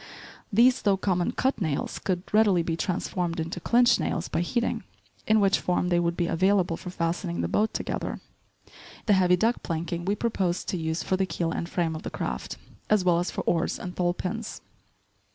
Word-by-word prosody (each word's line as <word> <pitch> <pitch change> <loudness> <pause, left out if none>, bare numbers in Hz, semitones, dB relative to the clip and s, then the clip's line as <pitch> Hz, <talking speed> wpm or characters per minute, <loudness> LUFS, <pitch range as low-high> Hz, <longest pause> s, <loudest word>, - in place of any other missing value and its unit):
These, 245 +5 +5
though 200 -2 +3
common 180 -2 0
"cut" 265 -4 0
nails, 155 -6 -2
could 180 -2 -1
readily 205 -5 +4
be 165 0 -1
transformed 175 -1 -2
into 165 +2 -3
"clinch" 240 +6 +4
nails 175 -2 -2
by - - 0
heating, 235 +7 -1 0.4
in 220 0 +5
which 195 -1 +3
form 180 0 0
they 175 -1 +3
would 170 0 0
be 175 - +1
available 185 0 +2
for 180 - -8
fastening 165 - -2
the 85 - 0
boat 215 - +1
together. - - -3 0.9
The 210 - +4
heavy 180 -2 +4
deck 230 +6 +1
planking 170 +1 -3
we 200 +2 +1
proposed 195 -5 -1
to 185 - -1
use 160 0 -2
for 185 - 0
the 190 0 0
keel 170 -2 -2
and 170 - -3
frame 165 -3 -1
of 155 - -6
the - - -5
craft, - - -4 0.3
as 210 -3 +3
well 175 -2 +4
as 175 - -1
for - - -3
oars 170 0 0
and 180 0 -7
thole 175 -1 +1
pins. 220 +5 -4
180 Hz, 195 wpm, -27 LUFS, 170-200 Hz, 0.9 s, These